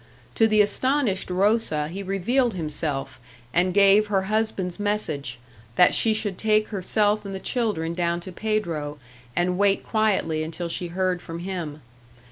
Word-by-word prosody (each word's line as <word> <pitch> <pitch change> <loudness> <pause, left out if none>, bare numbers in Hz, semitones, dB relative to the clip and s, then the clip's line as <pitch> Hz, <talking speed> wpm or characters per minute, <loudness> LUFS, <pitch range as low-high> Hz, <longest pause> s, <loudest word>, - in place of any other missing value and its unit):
To 225 - +4
the 215 -1 +4
astonished 230 -1 +1
Rosa 185 -5 +1
he 185 +5 -6
revealed 210 +5 0
himself, 150 -4 -3 0.3
and 180 +2 +3
gave 200 +2 +5
her 195 -2 +1
husband's 210 -3 -1
message 155 - -2 0.4
that 180 - +6
she 225 - +3
should 215 -3 -2
take 215 -1 +2
herself 210 +2 +1
and 195 -1 -6
the - - -4
children 205 -9 -1
down 170 0 0
to 185 - -8
Pedro, 170 -8 -2 0.4
and 180 +1 0
wait 200 -1 +3
quietly 200 -8 +1
until 165 +2 -4
she 175 +1 -2
heard 180 0 -1
from 165 - -7
him. 170 -4 -5
190 Hz, 150 wpm, -24 LUFS, 170-215 Hz, 0.4 s, that